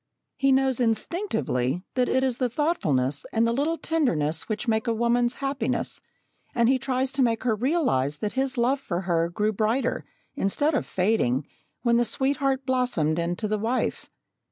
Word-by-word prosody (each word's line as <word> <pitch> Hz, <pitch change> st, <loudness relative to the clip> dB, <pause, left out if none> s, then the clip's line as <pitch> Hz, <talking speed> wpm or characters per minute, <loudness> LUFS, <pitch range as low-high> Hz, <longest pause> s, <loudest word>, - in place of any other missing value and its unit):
He 275 Hz, 0 st, +2 dB
knows 265 Hz, -1 st, +2 dB
instinctively 225 Hz, -, -1 dB
that 250 Hz, -1 st, +1 dB
it 260 Hz, +1 st, +2 dB
is 260 Hz, -2 st, 0 dB
the 250 Hz, -2 st, +1 dB
thoughtfulness 150 Hz, -, 0 dB
and 225 Hz, +1 st, +2 dB
the 230 Hz, -, +1 dB
little 300 Hz, +6 st, 0 dB
tenderness 170 Hz, -, 0 dB
which 215 Hz, +2 st, -3 dB
make 220 Hz, +1 st, +1 dB
a 230 Hz, -, +1 dB
woman's 240 Hz, +1 st, +2 dB
happiness, 275 Hz, 0 st, -2 dB, 0.5 s
and 235 Hz, -1 st, +3 dB
he 260 Hz, +1 st, +3 dB
tries 260 Hz, 0 st, -1 dB
to 270 Hz, 0 st, 0 dB
make 230 Hz, -3 st, +1 dB
her 245 Hz, -3 st, +2 dB
realise 225 Hz, -, +1 dB
that 210 Hz, +4 st, -3 dB
his 265 Hz, +1 st, -1 dB
love 255 Hz, +4 st, +2 dB
for 185 Hz, -9 st, -3 dB
her 170 Hz, -2 st, 0 dB
grew 210 Hz, +5 st, 0 dB
brighter, 225 Hz, +5 st, 0 dB, 0.3 s
instead 290 Hz, +11 st, +1 dB
of 285 Hz, -, -1 dB
fading, 180 Hz, -, +1 dB, 0.4 s
when 235 Hz, -1 st, +3 dB
the 240 Hz, -, +4 dB
sweetheart 270 Hz, +1 st, 0 dB
blossomed 245 Hz, -, +1 dB
into 175 Hz, +5 st, -1 dB
the 215 Hz, 0 st, -1 dB
wife. 235 Hz, +4 st, -1 dB
240 Hz, 170 wpm, -25 LUFS, 195-265 Hz, 0.5 s, the